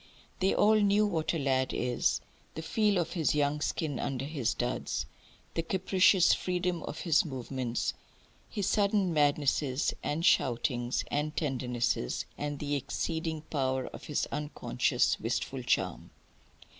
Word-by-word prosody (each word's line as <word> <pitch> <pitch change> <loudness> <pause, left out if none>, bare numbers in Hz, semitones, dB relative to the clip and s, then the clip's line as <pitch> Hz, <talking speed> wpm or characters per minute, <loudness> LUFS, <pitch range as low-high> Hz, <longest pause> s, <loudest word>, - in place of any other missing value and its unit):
They 190 +1 +2
all 215 +1 +5
knew 205 +1 +4
what 165 -6 0
a 165 - -1
lad 130 -3 0
is 125 -1 +1 0.3
the 160 - -5
feel 210 +2 +2
of 175 - 0
his 160 -4 +1
young 150 0 +1
skin 150 -3 -2
under 135 -1 -2
his 140 -6 -1
"duds," 120 0 -2 0.5
the 165 - 0
capricious 185 +1 +4
freedom 180 -1 -1
of - - -6
his 165 -4 +3
movements, 130 -4 -3 0.6
his 205 - -2
sudden 200 -3 +2
madnesses 145 -2 +2
and 160 +3 -1
shoutings 120 -1 +2
and 150 +1 -1
tendernesses, 125 - -1
and 145 0 -3
the 145 0 -3
exceeding 160 +3 -2
power 130 -3 0
of - - -9
his 150 - -1
unconscious 145 - 0
wistful - - -2
charm. - - -1
150 Hz, 135 wpm, -30 LUFS, 130-175 Hz, 0.6 s, all